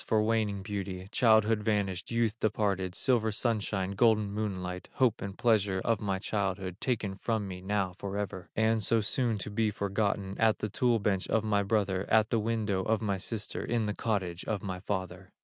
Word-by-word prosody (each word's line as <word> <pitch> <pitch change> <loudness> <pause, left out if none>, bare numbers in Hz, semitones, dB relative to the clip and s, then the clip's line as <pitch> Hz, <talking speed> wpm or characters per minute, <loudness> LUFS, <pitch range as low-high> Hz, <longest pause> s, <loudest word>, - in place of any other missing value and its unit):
for 110 -1 +3
waning 105 -3 0
beauty, 95 -2 -4
Childhood 110 -2 +4
vanished, 100 -4 -1
youth 115 -2 +1
departed, 100 -4 0
Silver 115 -4 +2
sunshine, 105 -4 0
golden 105 0 +3
moonlight, 95 -4 -4
Hope 125 -4 +2
and 100 -1 -5
pleasure 105 -5 +2
of 115 -3 +1
my 100 -2 0
childhood, 95 -2 -2
Taken 110 -6 -1
from 110 -3 -1
me 90 -1 -7
now 95 -1 -1
forever, 100 -2 -4
And 110 0 +2
so 115 +3 +2
soon 115 +1 0
to 105 +1 -5
be 110 +1 +1
forgotten 100 -1 -1
At 110 -1 +4
the 105 - -3
tool 120 +3 +2
bench 100 -3 0
of 110 - +1
my 105 -2 +2
brother, 100 -2 0
At 110 -1 +4
the 115 - +3
window 110 -3 0
of 110 +3 +1
my 100 -3 -1
sister, 110 +2 -3
In 115 -1 0
the 105 - -1
cottage 95 -7 -2
of 105 -3 -2
my 95 -2 -4
father." 95 -1 -4
105 Hz, 185 wpm, -30 LUFS, 95-110 Hz, -, Childhood